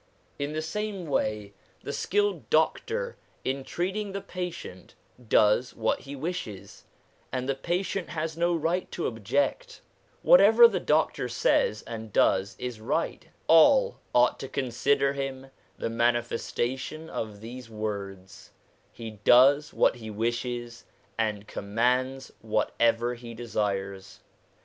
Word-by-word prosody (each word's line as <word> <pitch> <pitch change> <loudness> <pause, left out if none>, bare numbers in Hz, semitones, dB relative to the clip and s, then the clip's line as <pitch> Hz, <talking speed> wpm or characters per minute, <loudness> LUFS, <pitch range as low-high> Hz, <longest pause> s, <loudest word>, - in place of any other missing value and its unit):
In 145 +1 -2
the 155 0 -2
same 200 +2 -4
way, 105 -8 -1 0.3
the - - -4
skilled 205 -4 0
doctor 465 - 0 0.3
in 135 +1 -1
treating 190 +6 -3
the 200 - -3
patient 180 - -7 0.2
' 125 -2 -22
does 105 +4 +2
what 110 -1 0
he 140 +1 -9
wishes,' 130 - -6 0.5
and 130 0 -2
the 135 - +1
patient 180 +8 -2
has 160 0 -3
no 170 +1 +1
right 165 +3 -1
to 175 - -3
object; 140 - -1 0.4
what - - +8
ever 475 - +8
the - - -2
doctor - - +1
says - - +1
and 110 -1 -7
does 95 +1 +2
is 125 -3 -5
right; - - -2 0.2
all 210 - +5
ought 125 0 +3
to 135 - -5
consider 135 +2 +1
him 135 -1 -5 0.3
the - - -2
manifestation 120 +5 -1
of 110 -8 -5
these 120 +2 -9
words, 100 -3 -6 0.2
' - - -37
He 115 -1 -8
does 140 +5 +6
what - - +2
he 110 -2 -8
wishes, 120 +2 -3 0.3
and 105 -2 -1
commands 125 +6 -1
whatever 115 +2 +1
he 120 -1 -9
desires.' 100 -4 -3
125 Hz, 130 wpm, -27 LUFS, 110-160 Hz, 0.5 s, what